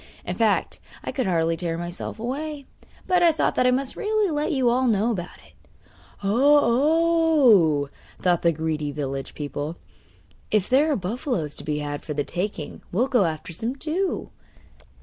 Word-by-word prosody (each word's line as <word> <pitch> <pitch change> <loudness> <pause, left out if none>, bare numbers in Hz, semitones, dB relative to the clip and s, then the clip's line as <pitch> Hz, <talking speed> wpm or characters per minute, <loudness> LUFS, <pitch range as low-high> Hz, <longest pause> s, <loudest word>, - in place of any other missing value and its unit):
In - - -2
fact, - - +1 0.2
I - - -3
could 255 -7 -1
hardly 165 -2 +1
tear 165 -1 -2
myself 175 +5 -5
away; 280 +4 -4 0.4
but 360 -1 +2
I 340 -1 +6
thought 315 - 0
that 250 - +2
I - - +5
must 260 +1 0
really 425 -3 0
let 300 +3 -1
you 265 -5 +1
all 250 +2 +3
know 220 +1 +2
about 180 -5 -5
it.' - - -21 0.7
'Oh, 280 - +4
oh!' 140 - -9 0.3
thought 175 -2 +2
the 170 - +4
greedy 155 -2 -2
village 135 -2 -4
people; 145 +2 -4 0.7
'if 210 -3 +1
there 285 +5 +3
are - - +2
buffaloes 195 - -2
to - - -8
be 150 -1 -2
had 145 -1 -4
for 150 - -6
the 145 - 0
taking 180 -3 -4
we'll 225 +8 +2
go 245 -8 +3
after 160 +1 -4
some 230 +10 -3
too. 330 +7 -2
220 Hz, 170 wpm, -24 LUFS, -, 0.7 s, I